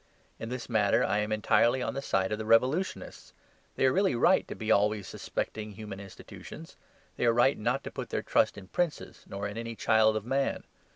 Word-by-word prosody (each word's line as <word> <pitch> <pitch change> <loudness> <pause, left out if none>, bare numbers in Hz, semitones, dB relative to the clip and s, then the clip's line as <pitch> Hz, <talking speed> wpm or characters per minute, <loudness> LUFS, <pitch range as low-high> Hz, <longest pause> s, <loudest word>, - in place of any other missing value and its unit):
In 115 - -6
this 125 0 -5
matter 105 -4 +2
I 105 - +1
am 105 +1 -2
entirely 120 +4 +2
on - - -2
the 135 - -4
side 95 -7 0
of 105 - -2
the 110 - -4
revolutionists. 130 +11 0 0.4
They - - +2
are 130 - +4
really 190 -8 +2
right 175 +10 +3
to - - -6
be 110 0 -2
always 105 -1 +2
suspecting 110 -1 -5
human 100 -1 -8
institutions; 100 -1 -11 0.4
they - - 0
are 115 - +4
right 120 +4 +4
not 125 +5 -1
to - - -7
put - - -6
their - - -2
trust - - +2
in 95 -2 -10
princes 175 -4 -3
nor 100 +1 -4
in 105 +2 -6
any 115 0 -5
child 110 0 +3
of 110 -1 -3
man. 135 +2 -1
110 Hz, 210 wpm, -29 LUFS, 105-130 Hz, 0.4 s, are